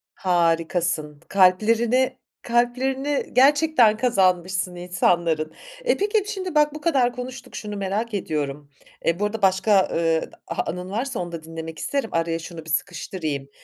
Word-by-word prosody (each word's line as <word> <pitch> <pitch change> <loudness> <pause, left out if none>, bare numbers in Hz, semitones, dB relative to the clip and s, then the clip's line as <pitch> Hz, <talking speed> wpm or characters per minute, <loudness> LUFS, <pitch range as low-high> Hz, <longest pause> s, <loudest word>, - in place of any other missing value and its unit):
Harikasın. 165 -3 0
K - - -27
kalplerini 225 +7 +3 0.2
kalplerini 260 +4 0
gerçekten 270 -4 +5
kazanmışsın 185 -6 +1
insanların. 175 -3 0 0.3
E, - - +3
peki, 415 +1 +1
şimdi 375 -5 -4
bak 300 0 +4
bu 305 - -7
kadar 265 -7 +2
konuştuk 250 0 -8
şunu 210 -2 -5
merak 205 +4 -2
ediyorum. 145 -6 -3 0.4
E, 170 +3 +1
bu 205 - +1
arada 210 +1 -3
başka, 190 +1 +4
ııı, 165 -1 +1
d - - -7 0.2
anın 180 +1 -3
varsa 240 +3 -3
onu 175 -1 -4
da 165 -2 -7
dinlemek 160 0 -7
isterim. 275 -5 -2
Araya 165 0 0
şunu 165 -1 -9
bir - - -10
sıkıştırayım. 150 -4 -3
190 Hz, 145 wpm, -23 LUFS, 165-250 Hz, 0.4 s, gerçekten